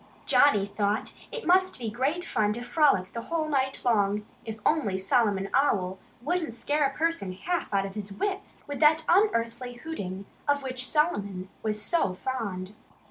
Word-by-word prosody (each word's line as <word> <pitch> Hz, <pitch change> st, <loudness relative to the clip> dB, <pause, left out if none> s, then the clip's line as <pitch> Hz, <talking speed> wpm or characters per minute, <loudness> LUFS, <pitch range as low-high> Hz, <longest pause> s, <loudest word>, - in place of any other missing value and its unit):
Johnnie 210 Hz, -9 st, +5 dB
thought 205 Hz, +1 st, -1 dB, 0.2 s
it 485 Hz, -, -5 dB
must 370 Hz, +1 st, +4 dB
be 230 Hz, -4 st, -4 dB
great 280 Hz, +10 st, -1 dB
fun 210 Hz, -1 st, +1 dB
to 240 Hz, +2 st, -6 dB
frolic 245 Hz, -, +2 dB
the 230 Hz, -, -4 dB
whole 320 Hz, +4 st, -2 dB
night 270 Hz, -3 st, 0 dB
long 210 Hz, -3 st, +2 dB, 0.2 s
if 220 Hz, -1 st, -5 dB
only 245 Hz, -12 st, +2 dB
Solomon 195 Hz, 0 st, +2 dB
Owl 190 Hz, -9 st, +2 dB, 0.2 s
wouldn't 325 Hz, -4 st, -1 dB
scare 290 Hz, +3 st, +1 dB
a 270 Hz, -, -8 dB
person 325 Hz, -, 0 dB
half 345 Hz, -, -2 dB
out 195 Hz, -1 st, +1 dB
of 195 Hz, -, -6 dB
his 205 Hz, -1 st, -5 dB
wits 390 Hz, -, -4 dB
with 285 Hz, -1 st, -5 dB
that 315 Hz, +1 st, +5 dB
unearthly 245 Hz, -, +2 dB
hooting 200 Hz, -, -6 dB, 0.2 s
of 285 Hz, -1 st, +2 dB
which 255 Hz, -1 st, -2 dB
Solomon 200 Hz, -, 0 dB
was 215 Hz, -1 st, -2 dB
so 210 Hz, -, +1 dB
fond. 200 Hz, -5 st, -4 dB
240 Hz, 165 wpm, -28 LUFS, 200-305 Hz, 0.2 s, Johnnie